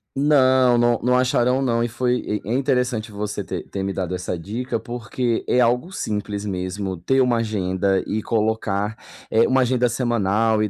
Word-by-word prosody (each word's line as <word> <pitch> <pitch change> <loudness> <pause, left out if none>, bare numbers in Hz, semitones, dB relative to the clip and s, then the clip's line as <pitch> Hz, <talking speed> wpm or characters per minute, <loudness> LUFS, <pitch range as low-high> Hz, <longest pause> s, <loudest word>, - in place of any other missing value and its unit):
Não, 130 -3 +4
não 120 -1 +3
não 125 0 +3
acharão 125 0 +2
não, 120 -3 +1
e - - 0
foi 120 -2 -1
e - - -8
é 115 - 0
interessante 125 -4 0
você 105 0 -4
ter - - -5
ter 95 - -4
me 100 0 -2
dado 90 -1 -3
essa 90 0 -4
dica, 115 +8 -4
porque 120 0 -3
é 125 - +2
algo 125 +8 +2
simples 105 - -3
mesmo 95 -1 -3
ter 130 +11 +1
uma 125 -2 +2
agenda 95 -3 0
e 110 +1 -2
colocar, 110 -2 -1 0.3
eh, 115 +1 +4
uma 130 0 +3
agenda 125 0 +2
semanal 115 -2 +1
e 105 - 0
115 Hz, 180 wpm, -22 LUFS, 100-125 Hz, 0.3 s, Não